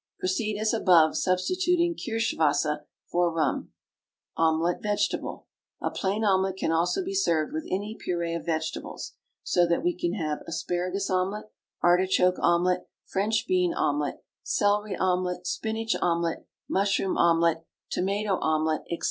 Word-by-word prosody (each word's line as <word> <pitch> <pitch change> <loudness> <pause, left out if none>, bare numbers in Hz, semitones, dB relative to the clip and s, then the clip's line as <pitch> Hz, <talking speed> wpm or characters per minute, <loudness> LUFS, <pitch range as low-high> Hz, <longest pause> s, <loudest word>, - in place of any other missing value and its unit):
Proceed 205 +3 -1
as 215 +1 +1
above, 175 -8 +5
substituting 345 - +1
Kirschenwasser 155 - 0 0.2
for 175 -1 +1
Rum. 160 -3 -1 0.7
OMELET, 165 +2 +1
VEGETABLE. 205 -1 -1 0.3
A - - -2
plain 200 +3 -1
omelet 190 -2 +2
can 160 - 0
also 175 - +1
be 385 - -3
served 165 - +1
with 155 - -4
any 205 +3 -2
puree 170 -2 -1
of 170 - -3
vegetables, 160 -1 -4 0.3
so 175 -1 +3
that 170 0 +1
we 175 0 +1
can 175 -1 -1
have 155 -6 -2
Asparagus 180 +4 -2
Omelet, 195 +4 -1 0.3
Artichoke 180 +1 +3
Omelet, 175 +1 +2 0.2
French 215 +3 0
Bean 360 -2 +2
Omelet, 145 0 -1 0.2
Celery 205 0 +1
Omelet, 180 -1 0
Spinach 225 +3 -1
Omelet, 170 -1 0 0.2
Mushroom 195 -1 +1
Omelet, 165 -1 +3 0.3
Tomato 200 +1 0
Omelet, 155 0 +1
&c. 170 - -3
180 Hz, 130 wpm, -27 LUFS, 165-205 Hz, 0.7 s, above